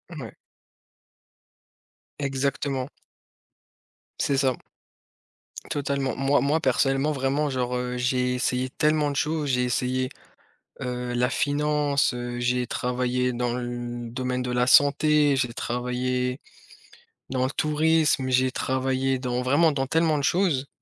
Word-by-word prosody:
Mouais. 120 -8 -8 1.9
Exactement. 135 -1 -2 1.3
C'est 140 - +1
ça. 130 -2 +2 1.2
Totalement, 140 -2 -1
moi 135 +1 +2
moi 150 +3 +2
personnellement 135 +2 +1
vraiment 140 +2 0
genre, 125 -1 -1
heu, 125 0 -3
j'ai 125 0 +1
essayé 125 0 -1
tellement 150 -1 +1
de - - -5
choses, 150 -1 -1
j'ai 125 -1 +2
essayé, 130 +1 0 0.7
heu, 125 -1 -3
la 125 +1 +2
finance, 145 -1 +1
heu, 120 0 -5
j'ai 125 0 0
travaillé 125 0 -1
dans 120 0 -1
le 120 -1 -5
domaine 125 +1 -2
de 125 0 -3
la 125 +1 +1
santé, 145 +1 +5
j'ai 125 -3 0
travaillé 125 +2 -2 0.9
dans 130 -1 0
le 130 - 0
tourisme, 155 -3 +2
j'ai 130 0 +3
travaillé 130 +1 0
dans 125 -1 -2
vraiment 145 +6 +3
dans 135 -2 -1
tellement 160 +2 +2
de 145 - -2
choses 160 -5 +1
130 Hz, 125 wpm, -25 LUFS, 125-145 Hz, 1.9 s, santé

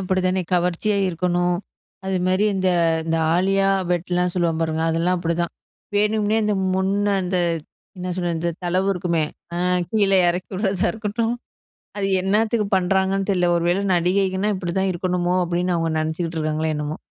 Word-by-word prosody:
அப்பிடி 185 0 0
தானே! 185 0 +1
கவர்ச்சியா 180 +4 +1
இருக்கணும். 175 0 0 0.5
அதுமாரி 185 +1 +1
இந்த 190 -1 +1 0.4
இந்த 165 0 0 0.2
ஆலியா 195 +1 +2 0.2
பெட்லாம் 180 +1 0
சொல்வாங்க 170 -3 0
பாருங்க 160 0 -1
அதெல்லாம் 170 +3 +1
அப்பிடிதான் 170 0 -1 0.4
வேணும்னே 210 +1 +2
இந்த 210 -1 +1 0.2
முன்ன 200 +2 +1
அந்த 180 +1 -1 0.6
என்ன 180 - -4
சொல்றது 175 -2 -1
இந்த 170 +1 0
தளவு 185 +2 +1
இருக்குமே! 170 -3 0 0.3
அ - - -3 0.3
கீழே 200 -3 +3
இறக்கி 180 +1 -2
விடுறதா 195 -1 0
இருக்கட்டும், 225 +1 -2 0.6
அது 195 - 0 0.2
என்னத்துக்கு 215 +2 +1
பண்ணுறாங்கன்னு 190 +1 +1
தெரில. 180 -2 +2
ஒரு 170 - 0
வேள 185 +3 +1
நடிகைகன்கனா 190 +3 +1
இப்பிடிதான் 190 +1 -1
இருக்கணுமோ! 180 0 0
அப்பிடின்னு 175 +1 0
அவுங்க 165 -1 0
நினைச்சுக்கிட்டு 160 +1 -2
இருக்காங்களோ, 155 0 -1
என்னமோ! 150 +1 -3
180 Hz, 145 wpm, -22 LUFS, 175-195 Hz, 0.6 s, கீழே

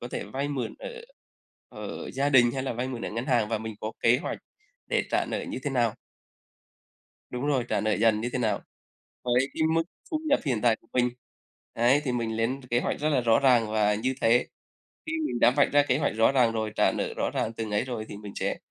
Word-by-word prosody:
có 120 - -6
thể - - -4
vay 140 +2 -3
mượn 135 -4 -3
ở - - -6 0.8
ở - - -7
gia 140 +2 0
đình 125 -4 +6
hay 130 +1 -3
là 135 - -2
vay 125 +3 -3
mượn 120 -3 -5
ở - - -3
ngân 115 +4 -4
hàng, 120 -5 +2
và 110 -2 0
mình 110 0 -6
có 110 +1 -4
kế 115 +1 +4
hoạch - - -3 0.5
để - - +1
trả - - +2
nợ - - -2
như - - -5
thế 145 - -2
nào. 120 -4 +1 1.4
Đúng 125 +3 -3
rồi, 135 -4 +1
trả - - +1
nợ 110 0 +1
dần 110 0 +3
như 120 - -2
thế - - -1
nào 115 -4 0 0.6
với 125 +2 +2
cái - - 0
mức 165 0 +2 0.3
thu 310 - 0
nhập 285 - +4
hiện 120 -6 0
tại 115 -2 +4
của - - -27
mình. 125 -1 +3 0.6
Ấy, 125 +5 +3
thì 130 - -1
mình 115 -2 -2
lên 125 +5 -1
kế 120 - +2
hoạch - - -2
rất 155 +1 +1
là 135 -4 +2
rõ 115 -1 +4
ràng 120 -5 +4
và 105 -1 +2
như 130 +5 -1
thế. 120 +2 +4 0.6
Khi 320 - -4
mình 120 - -3
đã 120 - +6
vạch 140 +2 +3
ra 145 0 +5
kế 130 - +3
hoạch 150 - 0
rõ 115 +3 +4
ràng 125 -4 +4
rồi, 110 -1 -2
trả - - +4
nợ - - -3
rõ - - -1
ràng 115 - -1
từng 110 -2 -5
ấy 105 +3 +1
rồi 120 -4 -4
thì 100 - -7
mình 105 -1 -9
sẽ - - -1
120 Hz, 245 wpm, -27 LUFS, 115-135 Hz, 1.4 s, đình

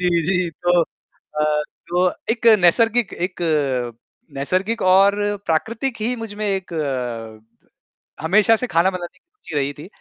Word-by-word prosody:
जी, 180 - +2
जी। 180 +1 0
तो 175 0 +4
अ, 150 -1 -3 0.3
जो 175 +1 0 0.3
एक 235 0 -1
नैसर्गिक 225 +5 +3
एक 180 -1 -5 0.9
नैसर्गिक 185 +11 -1
और 195 +2 +5 0.3
प्राकृतिक 230 - -1
ही 235 +4 0
मुझमें 215 -2 -5
एक 190 -3 -2
अ, - - -4
द 115 -6 -5 0.5
हमेशा 205 +7 +4
से 250 +3 -3
खाना 170 -2 +3
बनाने 175 -2 -7
की - - -34
रुचि 165 - -10
रही 140 0 0
थी, 145 +4 -11
180 Hz, 145 wpm, -21 LUFS, 150-215 Hz, 0.9 s, और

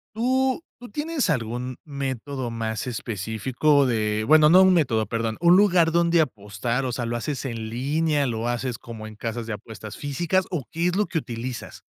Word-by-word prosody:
¿Tú 260 +5 +1 0.2
tú 245 -2 -10
tienes 295 - -1
algún 125 -2 -2
método 135 -2 -4
más 115 0 -3
específico 120 +6 +1
de 110 -3 0
bueno, 155 +1 +7
no 185 +3 +8
un 190 - +6
método, 120 -10 +2
perdón, 115 +1 -2
un 175 +1 +6
lugar 180 -5 +5
dónde 170 0 +3
apostar, 115 0 -2
o 125 - -1
sea, 120 0 -3
lo 120 - -2
haces 135 +4 -3
en 115 -3 -4
línea, 145 +5 0
lo 115 -1 -2
haces 120 0 -2
como 115 -3 -9
en 110 - -11
casas 115 +1 -4
de 110 - -3
apuestas 110 0 -9
físicas 175 +6 0
o 165 -7 -2
qué 165 +2 0
es 180 - 0
lo 210 - +2
que 165 - -1
utilizas? 120 -2 -6
130 Hz, 185 wpm, -24 LUFS, 115-165 Hz, 0.2 s, no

